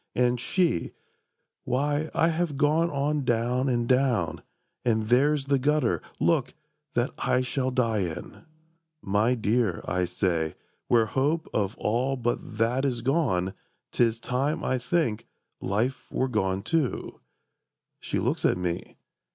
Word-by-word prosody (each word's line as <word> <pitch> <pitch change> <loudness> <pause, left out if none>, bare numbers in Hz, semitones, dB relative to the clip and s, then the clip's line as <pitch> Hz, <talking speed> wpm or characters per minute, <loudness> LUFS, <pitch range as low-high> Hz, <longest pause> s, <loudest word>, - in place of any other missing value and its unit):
And 125 0 +2
she—"Why, 145 - -2
I 165 - +4
have 165 -3 -1
gone 155 +3 +3
on 145 0 0
down 125 +2 +1
and 120 -2 0
down, 125 -10 +2 0.4
And 110 -3 +2
there's 140 +3 +3
the 140 -1 +2
gutter, 130 - +1 0.2
look, - - +1 0.4
that - - +1
I 125 - +2
shall 130 +1 -1
die 115 -4 +1
in!" 85 -5 -5 0.6
"My 105 +5 +2
dear," 110 -4 0
I 90 0 +1
say, 85 -3 -1 0.3
"where 115 -2 +4
hope 145 +8 0
of 100 0 -1
all 125 +5 0
but 120 -2 -3
that 120 +4 +1
Is 125 -4 -1
gone, 120 - +1 0.4
'tis 115 -1 +2
time, 140 +7 -1
I 130 - 0
think, 120 -6 0 0.3
life 115 +7 -1
were 130 - 0
gone 95 -5 0
too." 145 +2 -1 0.8
She - - -3
looks - - -1
at - - +3
me. 90 -1 -4
125 Hz, 135 wpm, -27 LUFS, 110-140 Hz, 0.8 s, I